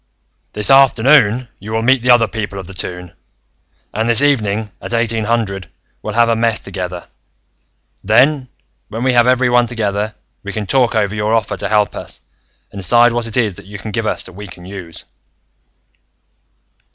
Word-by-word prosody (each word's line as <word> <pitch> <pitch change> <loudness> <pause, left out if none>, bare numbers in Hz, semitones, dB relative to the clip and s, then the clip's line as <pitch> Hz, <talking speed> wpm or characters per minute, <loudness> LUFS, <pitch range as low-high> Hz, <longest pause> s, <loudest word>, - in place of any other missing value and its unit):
"This 105 +5 +2
afternoon, 130 -2 +5
you 105 +3 -8
will 115 0 0
meet 130 +1 +3
the 125 - -2
other 120 -2 +6
people 105 -3 -5
of 95 - -6
the 95 - -11
Toon, 90 -1 -7 0.8
and 110 +2 -1
this 115 +4 +3
evening, 110 -7 +1
at 120 - -3
eighteen 115 -1 +1
hundred, 105 -5 -2 0.3
we'll 105 - -5
have 120 0 +4
a 115 - +2
mess 115 -1 +1
together. 90 -2 -6 1.0
Then, 130 +6 +3 0.4
when 115 +3 -4
we 130 -1 +2
have 120 0 +4
everyone 125 -1 +3
together, 105 -2 -2 0.3
we 100 -1 -7
can 110 -1 -3
talk 125 +2 +2
over 105 -2 +1
your 105 +1 0
offer 115 - -1
to - - -4
help 105 -1 +1
us, 60 - -6 0.5
and 100 - -8
decide 120 +6 +4
what 120 0 -1
it 115 - -3
is 110 -5 +1
that 100 -1 -12
you 100 0 -8
can 105 +2 -7
give 115 0 -2
us - - -1
that - - -8
we 105 +3 -9
can 90 -2 -12
use." 90 -4 -9
110 Hz, 180 wpm, -17 LUFS, 100-120 Hz, 1.0 s, other